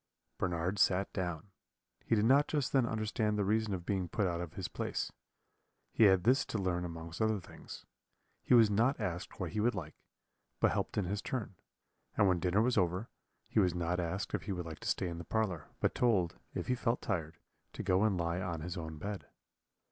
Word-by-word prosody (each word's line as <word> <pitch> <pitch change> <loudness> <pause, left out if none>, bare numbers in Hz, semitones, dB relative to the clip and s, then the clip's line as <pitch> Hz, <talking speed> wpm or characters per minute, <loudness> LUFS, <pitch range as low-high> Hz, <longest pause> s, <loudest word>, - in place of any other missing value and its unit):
Bernard 90 +2 -1
sat 95 0 +3
down. 90 -1 -3 0.5
He - - +2
did 105 0 +3
not 140 +4 +5
just 145 -4 -1
then 130 -4 +4
understand 110 -1 0
the 100 - +1
reason 110 +1 +1
of 90 -3 -3
being 95 -3 -1
put 105 - 0
out 85 -2 -1
of 85 -3 -6
his - - -3
place - - -3 0.8
he 110 - +5
had 95 -3 +5
this 130 +5 +4
to - - -3
learn 90 -3 0
amongst 85 +2 -6
other 110 -1 +2
things. - - -11 0.6
He - - +4
was 115 -2 +8
not 120 +7 +2
asked 90 +1 -4
what 90 -4 -3
he 105 - -2
would 115 +1 +2
like, 80 -5 -5 0.7
but - - +4
helped - - -2
in 105 - +2
his 100 +3 -2
turn; 120 -6 -3 0.6
and 100 - +5
when 90 -2 +3
dinner 95 +5 +2
was 125 -2 +3
over, 90 +4 0 0.4
he - - +1
was 90 -4 +3
not 90 +1 0
asked 90 +3 -2
if - - 0
he 105 - -3
would 90 -2 -3
like 80 -2 -7
to - - -6
stay 95 - 0
in 85 -1 -5
the - - -5
parlour, 95 -5 -1
but - - +1
told, 100 -9 +2 0.2
if - - -2
he 125 - +1
felt 120 -1 0
tired, 80 -7 -2 0.4
to - - -5
go 95 +1 +3
and 105 -4 +2
lie 85 +1 -1
on 85 -4 -3
his 90 +3 -5
own 80 -2 -5
bed. 100 +5 -5
95 Hz, 215 wpm, -33 LUFS, 85-110 Hz, 0.8 s, was